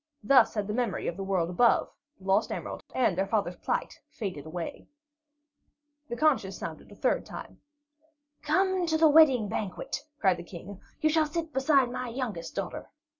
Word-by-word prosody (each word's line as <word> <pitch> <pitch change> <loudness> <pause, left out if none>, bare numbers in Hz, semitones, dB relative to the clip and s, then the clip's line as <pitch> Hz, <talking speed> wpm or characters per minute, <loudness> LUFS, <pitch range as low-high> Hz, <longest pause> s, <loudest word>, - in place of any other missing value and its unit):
Thus 245 +1 +5
had 210 -2 -1
the 210 - -3
memory 235 -3 -1
of 170 - -2
the 195 - -5
world 185 -3 0
above, 235 +7 +4 0.3
the 190 - -20
lost 195 +3 +2
emerald, - - -5
and 235 -8 +2
their 190 +2 0
father's 195 -4 -1
plight - - -3
faded 180 - -6
away. 165 +1 -6 1.2
The 235 - -3
conches 260 -9 +1
sounded - - -7
a - - -12
third - - +1
time. - - -10 0.8
"Come 375 +3 +1
to 320 -1 +2
the 320 0 +6
wedding 290 -8 +6
banquet," 205 +4 -4 0.2
cried 190 -8 +3
the 170 - -7
King. 180 +3 -10 0.2
"You 310 - +3
shall 315 -1 +3
sit 320 0 -4
beside 265 -2 +3
my 255 0 -4
youngest 230 -9 -5
daughter." - - -5
230 Hz, 175 wpm, -28 LUFS, 190-295 Hz, 1.2 s, the